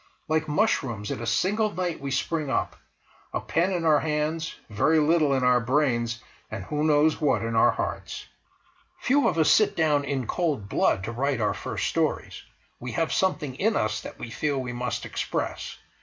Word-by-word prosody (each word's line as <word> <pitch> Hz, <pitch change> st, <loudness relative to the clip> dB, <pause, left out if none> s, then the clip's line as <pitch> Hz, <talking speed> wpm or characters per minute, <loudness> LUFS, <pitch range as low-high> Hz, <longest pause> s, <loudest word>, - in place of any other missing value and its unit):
Like 155 Hz, 0 st, 0 dB
mushrooms, 135 Hz, -, 0 dB
in -, -, -4 dB
a 115 Hz, -, -4 dB
single 205 Hz, -, +1 dB
sight 180 Hz, -3 st, -2 dB
we 140 Hz, -, -4 dB
spring 150 Hz, +2 st, -1 dB
up—a 125 Hz, -, -5 dB
pen 175 Hz, +4 st, 0 dB
in 175 Hz, -3 st, -1 dB
our 155 Hz, -2 st, +5 dB
hands, 155 Hz, +1 st, -2 dB
very 135 Hz, +9 st, +2 dB
little 155 Hz, -1 st, +3 dB
in 135 Hz, -1 st, +1 dB
our 125 Hz, 0 st, +5 dB
brains, 120 Hz, -3 st, 0 dB, 0.3 s
and -, -, -5 dB
who 150 Hz, 0 st, -2 dB
knows 155 Hz, +1 st, +3 dB
what 130 Hz, -8 st, +2 dB
in 115 Hz, 0 st, -2 dB
our 110 Hz, -, +5 dB
hearts! -, -, -4 dB, 0.7 s
Few 280 Hz, +2 st, +2 dB
of 165 Hz, -, 0 dB
us 160 Hz, -2 st, +4 dB
sit 215 Hz, -, +4 dB
down 150 Hz, -3 st, +2 dB
in 140 Hz, -3 st, -2 dB
cold 145 Hz, -, -1 dB
blood 95 Hz, -, +1 dB
to 110 Hz, -, -4 dB
write 135 Hz, +2 st, -1 dB
our 105 Hz, -2 st, +1 dB
first -, -, -4 dB
stories; -, -, -1 dB, 0.4 s
we 120 Hz, -1 st, -6 dB
have 165 Hz, +5 st, 0 dB
something 155 Hz, -8 st, 0 dB
in 210 Hz, -, 0 dB
us 110 Hz, 0 st, 0 dB
that -, -, -9 dB
we 115 Hz, -, -7 dB
feel 145 Hz, +3 st, -1 dB
we 125 Hz, -2 st, -3 dB
must 125 Hz, -1 st, -3 dB
express. -, -, -3 dB
145 Hz, 185 wpm, -26 LUFS, 120-160 Hz, 0.7 s, our